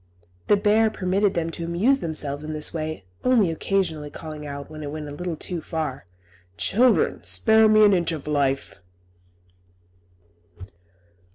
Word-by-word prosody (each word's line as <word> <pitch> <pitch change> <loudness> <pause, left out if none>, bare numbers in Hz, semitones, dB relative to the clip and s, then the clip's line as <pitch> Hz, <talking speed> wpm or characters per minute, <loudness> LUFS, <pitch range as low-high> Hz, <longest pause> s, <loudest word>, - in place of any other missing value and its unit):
The 205 - +5
bear 215 +2 +3
permitted 195 0 0
them 165 -1 -1
to 170 - -6
amuse 195 +12 +2
themselves 150 - -3
in 155 0 -5
this 150 0 0
way, 155 - -4 0.2
only 230 -9 +3
occasionally 160 -3 -1
calling 150 0 -8
out, 140 0 -7
when 155 0 -9
it 145 - -5
went 150 0 -6
a - - -7
little 170 +3 -4
too 170 +2 -4
far, 155 - -4 0.5
"Children, 245 +3 +2
spare 220 -1 +4
me 215 0 +6
an 205 - +5
inch 170 -2 +1
of 155 -4 -5
life!" 140 -6 -1
165 Hz, 150 wpm, -24 LUFS, 150-200 Hz, 0.5 s, me